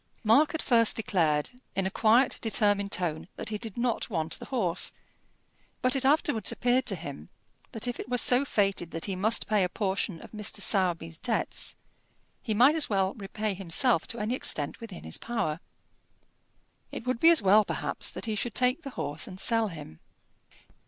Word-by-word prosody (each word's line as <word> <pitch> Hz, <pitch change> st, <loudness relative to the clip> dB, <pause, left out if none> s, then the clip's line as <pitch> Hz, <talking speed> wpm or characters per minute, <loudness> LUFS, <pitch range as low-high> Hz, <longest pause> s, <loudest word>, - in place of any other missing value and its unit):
Mark 275 Hz, +9 st, +4 dB
at 320 Hz, -, -3 dB
first 230 Hz, -3 st, +4 dB
declared, 160 Hz, -9 st, 0 dB, 0.2 s
in 195 Hz, -, 0 dB
a 190 Hz, -, -1 dB
quiet, 230 Hz, +6 st, +3 dB
determined 205 Hz, -2 st, +1 dB
tone, 170 Hz, -4 st, -1 dB
that -, -, -5 dB
he 210 Hz, -1 st, -4 dB
did 225 Hz, -2 st, -6 dB
not 235 Hz, -1 st, -1 dB
want 160 Hz, 0 st, -2 dB
the -, -, -8 dB
horse; 185 Hz, -10 st, 0 dB, 0.9 s
but 255 Hz, +1 st, +3 dB
it 270 Hz, -, -1 dB
afterwards 275 Hz, -4 st, +2 dB
appeared 250 Hz, +1 st, +1 dB
to 200 Hz, -, +1 dB
him 140 Hz, -, -9 dB, 0.4 s
that 225 Hz, +2 st, -4 dB
if 245 Hz, -, -4 dB
it -, -, -7 dB
were 250 Hz, -, 0 dB
so 245 Hz, +3 st, +4 dB
fated 195 Hz, -, 0 dB
that 165 Hz, -1 st, -4 dB
he 195 Hz, -, -3 dB
must 215 Hz, +5 st, +2 dB
pay 210 Hz, -3 st, +2 dB
a 180 Hz, -, 0 dB
portion 195 Hz, -3 st, -2 dB
of -, -, -13 dB
Mr. 210 Hz, -1 st, -2 dB
Sowerby's 170 Hz, -5 st, 0 dB
debts, 240 Hz, -3 st, -2 dB, 0.7 s
he 220 Hz, -4 st, -2 dB
might 255 Hz, +7 st, +6 dB
as 315 Hz, -2 st, +2 dB
well 195 Hz, -2 st, +1 dB
repay 210 Hz, 0 st, -4 dB
himself 170 Hz, -3 st, +2 dB
to 235 Hz, -, -3 dB
any 215 Hz, +2 st, -2 dB
extent 150 Hz, -, -1 dB
within 220 Hz, -6 st, -9 dB
his 80 Hz, -, -3 dB
power. 195 Hz, -10 st, -2 dB, 1.3 s
It -, -, -7 dB
would 255 Hz, -2 st, -1 dB
be 325 Hz, -, +6 dB
as 335 Hz, -10 st, +5 dB
well 205 Hz, +3 st, +6 dB
perhaps -, -, -3 dB
that -, -, -4 dB
he 220 Hz, -, -2 dB
should 215 Hz, +2 st, -3 dB
take 255 Hz, +5 st, +2 dB
the 280 Hz, -, -7 dB
horse 145 Hz, +2 st, -3 dB
and 185 Hz, -, -9 dB
sell 225 Hz, +1 st, +1 dB
him. 150 Hz, -, -10 dB
210 Hz, 185 wpm, -28 LUFS, 185-240 Hz, 1.3 s, might